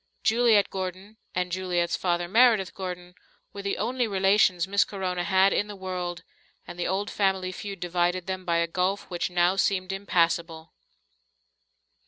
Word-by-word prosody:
Juliet 225 -3 +3
Gordon 190 +3 -6 0.2
and 180 0 -1
Juliet's 175 -1 -1
father, 175 -1 -1
Meredith 220 -1 +4
Gordon, 180 -2 -7 0.4
were 200 - -6
the 200 0 -2
only 245 +3 -1
relations 195 -3 +3
Miss 200 +1 +3
Corona 185 -3 -3
had 190 +2 +3
in 205 - 0
the 205 - -8
world, 180 -2 -5 0.4
and 175 - -10
the 175 - -1
old 195 +3 -2
family 190 -2 0
feud 195 +1 -7
divided 175 0 0
them 185 -1 -4
by 170 -2 0
a 170 - +2
gulf 185 +4 -1
which 175 0 -2
now 180 +1 +2
seemed 185 -1 +1
impassable. 170 -4 -1
185 Hz, 155 wpm, -26 LUFS, 175-200 Hz, 0.4 s, Meredith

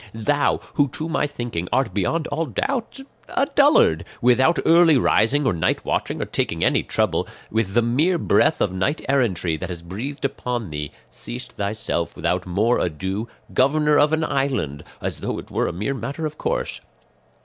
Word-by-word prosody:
Thou, 145 +7 +1
who, 145 - +3
to 155 +5 -4
my 160 -3 0
thinking, 120 -11 -4
art 130 -8 +1
beyond 150 - 0
all 160 +3 -1
doubt 260 - -2 0.3
a 275 - +1
dullard, 280 - +5 0.2
without 130 +7 +4
early 165 -3 +6
rising 130 +5 +3
or 120 - +2
night 85 - 0
watching - - -1
or - - -1
taking - - -1
any - - +3
trouble, - - 0 0.2
with 110 -2 -1
the 120 - +4
mere 150 +10 +2
breath 160 - +2
of 95 - +1
knight 95 - -1
errantry 100 - +1
that 95 +3 -5
has 85 -2 -6
breathed 125 +12 -5
upon 120 - -3
thee, 75 -1 -4 0.2
seest - - -6
thyself 100 -5 -2
without 90 0 -1
more 105 +7 +2
ado 95 +6 -2 0.3
governor 150 +3 +3
of 150 +1 +4
an 160 0 +1
island, 130 - -1 0.2
as - - -3
though - - -3
it - - -9
were - - 0
a - - -1
mere 105 +10 -2
matter 140 +4 -4
of 155 0 -4
course. - - -2
125 Hz, 175 wpm, -22 LUFS, 95-150 Hz, 0.3 s, early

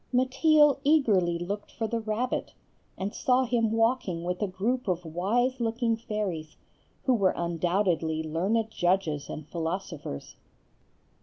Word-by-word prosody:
Mateel 280 +4 +4
eagerly 210 - +3
looked 200 +4 -4
for 225 - -3
the 230 +1 -1
rabbit, 225 +3 -2 0.4
and 195 +2 -3
saw 255 0 +2
him 230 -2 +1
walking 225 -7 +1
with 180 +2 -3
a 205 - +1
group 225 +7 -1
of 180 -2 -1
wise 225 +11 0
looking 230 0 0
fairies, 205 -8 -4 0.5
who 260 - +3
were 195 -6 +2
undoubtedly 170 -1 0
learned 195 +8 0
judges 175 -6 0
and 155 -1 -7
philosophers. 165 - -5
205 Hz, 130 wpm, -28 LUFS, 175-235 Hz, 0.5 s, Mateel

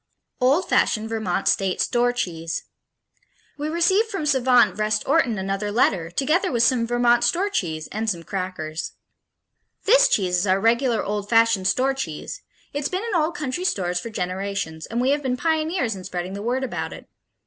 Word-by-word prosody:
Old 275 +8 +2
Fashioned 220 0 +1
Vermont 215 -4 -2
State 190 -2 +1
Store 245 0 +2
Cheese 165 -8 -3 1.0
We 300 +1 -2
received 375 +7 +2
from 390 -8 -3
savant 260 -4 +4
Vrest 215 0 -1
Orton 270 -6 +2
another 195 +2 -2
letter, 190 -7 +1
together 310 - +1
with 235 -2 +2
some 240 -3 +2
Vermont 240 0 +3
store 390 +4 +1
cheese 160 - -2
and 220 +2 -2
some 170 -4 -3
crackers. 180 -4 -4 0.9
This - - +6
cheese 180 -3 +1
is 185 +3 0
our 190 +1 +3
regular 235 +2 +2
old 205 0 -3
fashioned 225 -4 +3
store 265 +6 +2
cheese 165 - -6 0.3
it's 285 0 -2
been 375 +3 -2
in 450 - -3
old 335 0 +1
country 305 +3 -3
stores 180 - 0
for 230 - -6
generations 185 -4 -4
and 230 - -3
we 260 +2 +2
have 290 +1 +1
been 255 -2 -1
pioneers 320 - 0
in 185 - -9
spreading 180 0 -5
the 200 - -5
word 250 +4 -1
about 255 - -4
it. - - -12
230 Hz, 175 wpm, -23 LUFS, 190-280 Hz, 1.0 s, This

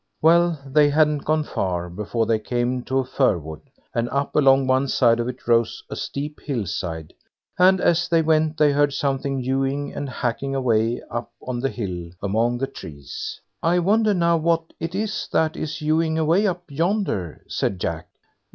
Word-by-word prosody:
Well! 170 0 +4
they 145 +2 +4
hadn't 150 -1 +2
gone 155 0 +2
far 90 -9 -2
before 105 +6 -2
they 110 0 +1
came 120 +2 -1
to 130 - -1
a 135 - +1
fir 130 -6 +2
wood, 80 -1 -8 0.3
and 115 +1 -1
up 140 +1 -2
along 135 -2 +5
one 130 +1 +2
side 120 -3 +3
of 120 - -1
it 125 -1 -7
rose 115 -1 +2
a - - -3
steep 150 +2 -5
hill 125 -8 -2
side, 80 -2 -5 0.5
and 185 +1 +6
as 175 -1 +2
they 165 -1 +3
went, 155 0 +2
they 150 -1 +4
heard 145 0 +2
something 135 -1 -1
hewing 135 +2 -1
and 145 -1 -4
hacking 130 +2 -2
away 115 -2 +1
up 120 0 -4 0.2
on 125 -1 -3
the 135 +2 0
hill 90 -8 -5
among 115 +5 0
the 135 - -1
trees. 70 - -8 0.2
"I 170 +2 +2
wonder 210 +4 +3
now 170 -1 +3
what 165 0 0
it 165 +2 -4
is 215 +1 -2
that 160 -1 +2
is 155 -1 -4
hewing 160 +1 +1
away 165 +6 +3
up 175 -2 -2
yonder?" 165 - -1
said 95 - -2
Jack. 85 -3 -3
135 Hz, 180 wpm, -23 LUFS, 115-160 Hz, 0.5 s, and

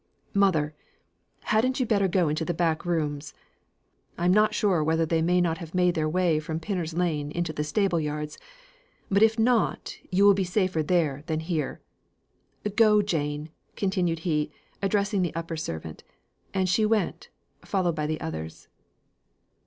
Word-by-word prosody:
Mother! 165 -7 +2 0.7
hadn't 250 +5 +1
you 255 - +2
better 200 -4 +2
go 180 -2 +2
into 155 +2 -1
the 170 +1 -2
back 165 -1 0
rooms? 150 -3 -2 0.8
I'm 175 +1 +2
not 215 +1 +3
sure 185 -7 +2
whether 160 +1 +2
they 160 0 +1
may 180 +2 +3
not 170 -1 0
have 170 -1 -8
made 180 -1 +3
their 155 -2 0
way 170 -2 +2
from 160 0 -4
Pinner's 170 -3 -3
Lane 160 -5 0
into 170 +1 -2
the 150 - -2
stable 175 +3 +1
yard; 150 0 -3 0.8
but 200 +1 +3
if 220 +1 +5
not, 230 0 +1
you 195 +2 +3
will 200 - +8
be 195 0 0
safer 185 -2 0
there 155 -4 +1
than 160 -2 -1
here. 160 -4 -3 0.9
Go, 210 -2 +5
Jane!" 150 -4 -2 0.2
continued 185 -4 0
he, 150 -3 +1 0.3
addressing 200 0 +1
the 175 -3 -2
upper 165 0 -4
servant. 80 - -6 0.5
And 190 -1 0
she 185 +5 +2
went, 215 0 0 0.3
followed 185 -4 0
by 150 -1 -1
the 155 0 -2
others. 80 0 -6
170 Hz, 160 wpm, -26 LUFS, 155-195 Hz, 0.9 s, will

